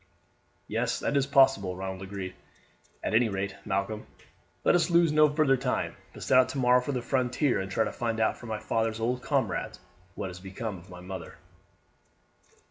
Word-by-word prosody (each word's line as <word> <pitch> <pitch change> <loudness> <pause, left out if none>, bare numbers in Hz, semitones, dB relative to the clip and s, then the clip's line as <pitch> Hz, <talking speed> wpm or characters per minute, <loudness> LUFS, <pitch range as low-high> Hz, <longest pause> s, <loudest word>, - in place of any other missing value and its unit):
"Yes, - - -1
that - - -1
is 140 -1 +2
possible," 135 -10 +4
Ronald 95 0 -5
agreed. 95 -1 -6 0.7
"At - - -1
any 115 +1 +4
rate, 95 0 -3
Malcolm, 105 +1 -2 0.6
let - - +4
us 175 0 +3
lose 170 -2 +4
no 150 0 +5
further 145 -2 +3
time, 125 0 -1 0.2
but - - -9
set 130 - +5
out 130 - +4
tomorrow 125 -2 +3
for 135 - -3
the 125 -3 -2
frontier 130 0 +1
and 95 - -5
try 110 +4 +1
to - - -3
find 115 -2 -2
out 110 - +2
from 120 - -10
my 110 - -1
father's 110 +1 -1
old 125 +2 -1
comrades - - -1 0.4
what 95 - -4
has 90 - -10
become 95 +1 -5
of 85 - -17
my 90 -1 -10
mother." 90 -2 -8
115 Hz, 185 wpm, -28 LUFS, 95-130 Hz, 0.7 s, no